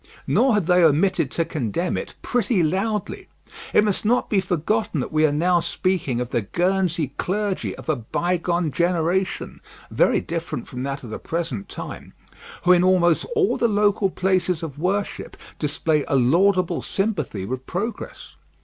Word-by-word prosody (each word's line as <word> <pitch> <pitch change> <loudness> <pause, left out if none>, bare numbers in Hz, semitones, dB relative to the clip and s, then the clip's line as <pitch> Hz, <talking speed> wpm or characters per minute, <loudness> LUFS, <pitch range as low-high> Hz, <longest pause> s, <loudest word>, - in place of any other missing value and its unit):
Nor 260 -4 +3
had 205 -5 +1
they 180 0 +4
omitted 160 -1 +3
to 165 - -1
condemn 165 - -2
it - - -5
pretty 225 -6 +1
loudly. 195 +6 -2 0.4
It - - +5
must 205 -3 0
not 240 +4 +1
be 200 -3 +3
forgotten 190 +1 -1
that 125 - -3
we 155 0 +4
are - - 0
now 175 +4 +2
speaking 170 -7 -1
of 125 0 -4
the 120 - +1
Guernsey 175 - 0
clergy 200 +1 -2
of - - -12
a 155 - +2
bygone 170 +6 -1
generation, 175 +3 -1 0.3
very - - +3
different 165 -6 -5
from 125 - -6
that 135 +1 -4
of 115 - -8
the - - -5
present 160 -11 -4
time, - - -8 0.5
who 180 - +5
in 180 -1 +5
almost 175 -3 +3
all 405 -3 +2
the 235 - +2
local 205 -2 +2
places 185 -2 0
of 145 -3 -6
worship 195 +4 -2 0.2
display 150 0 0
a - - +1
laudable 180 +8 +3
sympathy 160 - -2
with 130 +4 -5
progress. 210 +5 -5
175 Hz, 160 wpm, -23 LUFS, 155-195 Hz, 0.5 s, It